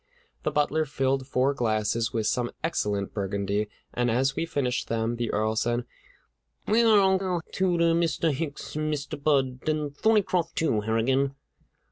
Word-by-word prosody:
The - - 0
butler 150 +1 +1
filled 135 -1 -1
four 135 +1 +2
glasses 115 -2 0
with 115 -3 -1
some 120 +1 0
excellent 105 -11 -1
Burgundy, 100 +1 -1 0.2
and 120 0 +1
as 135 +4 +1
we 165 - -1
finished 125 -5 -1
them, 115 +1 -1
the 120 -1 -2
Earl 110 +1 0
said: 120 +2 0 0.8
"Where 230 +2 +4
are 215 -2 +6
Uncle 190 -3 +1
Tooter, 170 -3 +2
Mr. 165 -1 +1
Hicks, 150 +1 -5
and 155 0 -1
Mr. 145 0 -4
Budd, 135 -2 +1
and 150 -2 -1
Thorneycroft, 200 -4 +1
too, 120 -10 +1
Harrigan?" 130 +6 +1
135 Hz, 150 wpm, -27 LUFS, 115-160 Hz, 0.8 s, are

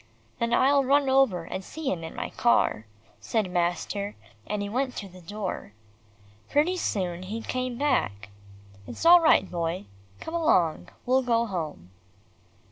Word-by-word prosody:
"Then 235 0 0
I'll 275 +3 +4
run 275 +1 +3
over 265 -10 +3
and 190 +3 -6
see 310 +7 -4
him 165 -3 -3
in 160 - -7
my 245 - -4
car," 115 - +2 0.3
said 215 -5 -1
master, 180 +3 -1 0.3
and 210 -1 -2
he - - -3
went 255 +4 -2
to 200 - -5
the 185 -1 -14
door. 190 - -5 0.8
Pretty 305 +6 +2
soon 180 - -2
he 215 +5 -5
came 255 -1 -3
back. 100 - 0 0.6
"It's - - -6
all 350 +1 +9
right, 315 - +4
Boy. 170 - -3 0.3
Come 320 - -7
along, 170 - +2 0.2
we'll 260 +2 +3
go 235 -2 +1
home." 155 - -5
210 Hz, 150 wpm, -27 LUFS, 175-265 Hz, 0.8 s, all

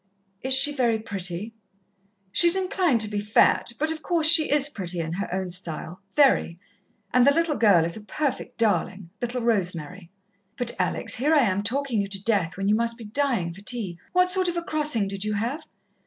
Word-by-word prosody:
"Is 260 0 +1
she 290 +2 +5
very 240 -5 +1
pretty?" 200 0 -3 0.8
"She's 340 - +5
inclined 365 - +1
to 215 - +7
be 210 0 -3
fat, 210 +3 +2
but, 310 +2 0
of 320 -1 -5
course, 335 -2 0
she 315 -1 +6
is 290 -1 +3
pretty, 185 -10 -3
in 165 0 -4
her 200 +3 -5
own 185 0 -3
style 175 0 -4
very. 270 - +3 0.6
And 250 - +4
the 280 - +5
little 330 0 0
girl 200 -9 +4
is 170 - -4
a 220 - -9
perfect 275 +6 -4
darling 190 -4 0
little 245 +1 -3
Rosemary. 180 -5 -2 0.5
"But, 245 -1 -2
Alex, 180 - 0
here 295 +6 +2
am 210 -10 +2
I - - -1
talking 245 +1 -1
you 200 - -4
to 195 0 -6
death 195 -7 0
when 195 0 -2
you 205 - +3
must 230 +1 0
be 235 - -10
dying 220 -7 -1
for 195 - -13
tea. 205 -6 -2
What 365 0 +3
sort 370 0 +1
of 350 0 -2
a 340 - -3
crossing 300 -11 -1
did 195 0 -5
you 215 0 -2
have?" 240 +10 -4
225 Hz, 200 wpm, -24 LUFS, 190-285 Hz, 0.8 s, to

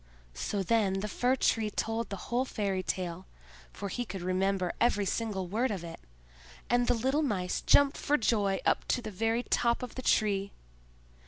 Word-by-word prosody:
So 195 - -2
then 195 -2 +1
the 210 - -2
Fir 250 +5 +1
tree 225 -4 +1
told 225 +2 -2
the 200 - -3 0.2
whole 245 +2 +2
fairy 200 -7 -2
tale, 180 -1 -4 0.4
for 200 - -6
he 245 +5 -3
could 195 -6 -6
remember 185 0 0
every 205 -4 +3
single 200 -2 -2
word 225 +8 0
of 195 -6 -3
it; 165 -1 -8 0.7
and 245 0 +3
the - - +3
little 265 +6 +1
Mice 190 -11 -1
jumped 285 -1 +4
for 295 - +1
joy 205 -5 +1
up - - +2
to 245 - 0
the 215 - -5
very 225 +4 0
top 235 0 +1
of 250 - -6
the 255 - -5
Tree. 200 -4 +1
210 Hz, 180 wpm, -30 LUFS, 190-240 Hz, 0.7 s, jumped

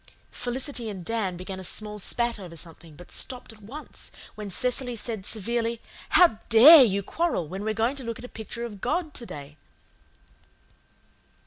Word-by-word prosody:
Felicity 245 -1 -2
and 190 -4 -7
Dan 195 -4 -1
began 185 +1 -6
a - - -7
small 210 +2 -3
spat 235 +3 -1
over 175 -4 -9
something, 165 -1 -8
but 175 +3 -14
stopped 250 -3 -4
at 215 - -18
once 265 +10 -7 0.2
when 210 -2 -7
Cecily 250 +4 0
said 220 -3 -4
severely, 230 +2 0 0.3
"How 340 -12 +5
DARE 270 +8 +10
you 200 -2 0
quarrel 320 - -1
when 190 +5 -6
you 210 - -4
are 220 - +1
going 230 +5 +1
to 265 - -5
look 230 -1 -4
at 245 - -9
a - - -7
picture 235 +1 -6
of 205 -4 -9
God 320 -2 -1
to 235 - -5
day?" 145 +1 -9
220 Hz, 180 wpm, -26 LUFS, 190-245 Hz, 0.3 s, DARE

